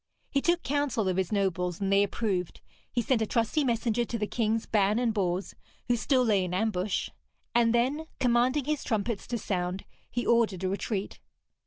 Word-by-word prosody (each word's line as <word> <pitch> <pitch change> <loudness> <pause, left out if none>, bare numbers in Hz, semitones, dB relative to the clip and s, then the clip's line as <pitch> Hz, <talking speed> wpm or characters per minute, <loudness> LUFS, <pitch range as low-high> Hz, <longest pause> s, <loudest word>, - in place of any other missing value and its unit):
He 275 - +2
took 345 +2 +1
counsel 275 -7 0
of 185 -1 0
his 190 0 0
nobles, 180 -4 0
and 195 -1 0
they 200 - +5
approved; 200 -3 -1 0.3
he 240 - 0
sent 240 -1 +1
a 220 - 0
trusty 230 +8 +1
messenger 235 -2 +1
to 235 0 -3
the 210 - -1
Kings 225 0 0
Ban 210 0 +2
and 240 -2 +1
Bors, 185 -2 -1 0.3
who 245 - +3
still 255 +2 +2
lay 205 -4 +3
in 180 0 -3
ambush; 200 -1 -1 0.4
and 235 -1 +4
then, 265 +7 +1
commanding 250 +3 +2
his 300 -1 -1
trumpets 220 -1 -2
to 240 - -2
sound, 185 -3 -2 0.2
he 240 - -2
ordered 220 -6 +2
a 185 - +1
retreat. 200 +1 -3
220 Hz, 185 wpm, -28 LUFS, 195-240 Hz, 0.4 s, they